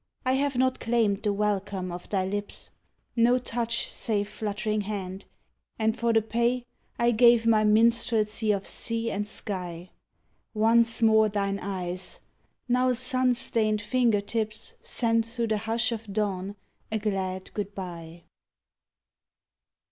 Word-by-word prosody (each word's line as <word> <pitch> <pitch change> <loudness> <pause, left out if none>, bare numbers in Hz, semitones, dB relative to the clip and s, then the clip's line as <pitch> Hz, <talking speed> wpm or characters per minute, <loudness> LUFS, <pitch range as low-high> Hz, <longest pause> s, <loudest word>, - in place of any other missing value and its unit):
I 255 - +2
have 275 -1 0
not 260 0 +2
claimed 225 -4 +1
the 210 - +1
welcome 200 -2 -1
of 175 +1 -8
thy 190 -2 0
lips; 205 +1 -5 0.4
No 240 +1 +4
touch 235 -1 -2
save 205 -2 -1
fluttering 215 0 -2
hand, 195 -2 -5 0.5
and 220 0 +1
for 235 -1 +1
the 225 -1 +3
pay 235 +2 0 0.3
I 235 0 +3
gave 235 0 +5
my 220 -2 +4
minstrelsy 220 0 +3
of 200 -1 -1
sea 230 0 -3
and 205 +1 -2
sky. 180 -4 -5 0.6
Once 230 +1 +3
more 220 -1 +5
thine 200 -1 -1
eyes! 185 -2 -5 0.5
Now 250 +1 +3
sun 255 0 +2
stained 215 -3 +1
finger 230 -2 +2
tips, 215 +1 -3
Send 230 -1 +1
through 230 0 -3
the 215 - +1
hush 225 +2 0
of 225 -2 -5
dawn 200 -1 -2 0.4
a 220 - +1
glad 190 -3 -3
good 205 -1 -4
bye. 170 -3 -8
215 Hz, 135 wpm, -27 LUFS, 200-235 Hz, 0.6 s, gave